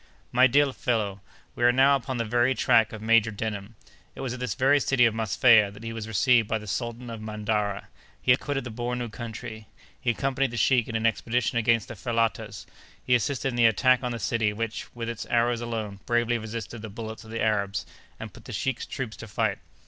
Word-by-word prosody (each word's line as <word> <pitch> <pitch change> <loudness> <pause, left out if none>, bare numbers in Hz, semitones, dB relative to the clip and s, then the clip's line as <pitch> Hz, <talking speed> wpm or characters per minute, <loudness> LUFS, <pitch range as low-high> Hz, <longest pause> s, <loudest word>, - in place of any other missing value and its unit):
"My 125 +2 +6
dear 140 +1 +3
fellow, 105 -7 -1 0.3
we - - -4
are 120 - +7
now 135 +3 +5
upon 130 -1 -3
the 115 - -1
very 120 +3 +2
track 110 -1 +3
of 110 -1 -8
Major 115 0 +4
Denham. 105 0 -5 0.4
It - - -7
was 130 -2 -3
at 125 - -7
this 125 -4 -3
very 140 +2 +4
city 135 -3 +3
of 115 - +2
Mosfeia 110 0 +4
that 100 +2 -13
he 115 0 -5
was 110 -1 -6
received 115 +1 +3
by 110 - 0
the 105 - -9
Sultan 120 +3 -4
of 115 -1 -7
Mandara; 105 -2 -2 0.3
he - - +2
had 125 - +5
quitted 145 -2 -3
the 120 - -6
Bornou 120 0 -3
country; 110 -1 -7 0.3
he 130 - 0
accompanied 135 +3 0
the 120 - -6
sheik 120 +1 +3
in 115 - -5
an 110 0 0
expedition 120 +1 +1
against 115 -1 +2
the - - -7
Fellatahs; 115 -2 -2 0.4
he 125 - +1
assisted 130 +2 +1
in 125 - -5
the 120 -1 +5
attack 125 +3 +3
on 125 -1 -2
the 120 - -3
city, 115 -1 0
which, 115 +1 -4
with 115 -1 -4
its 115 -1 -5
arrows 120 0 +1
alone, 110 -4 -4
bravely 120 0 +1
resisted 110 0 -6
the 110 - -7
bullets 110 +1 -7
of 110 - -14
the 115 +1 -4
Arabs, 100 -2 0 0.3
and - - -8
put - - -15
the - - -8
sheik's 125 +4 -2
troops 125 -5 -5
to 115 - -9
flight. 100 - -1
115 Hz, 220 wpm, -26 LUFS, 110-125 Hz, 0.4 s, are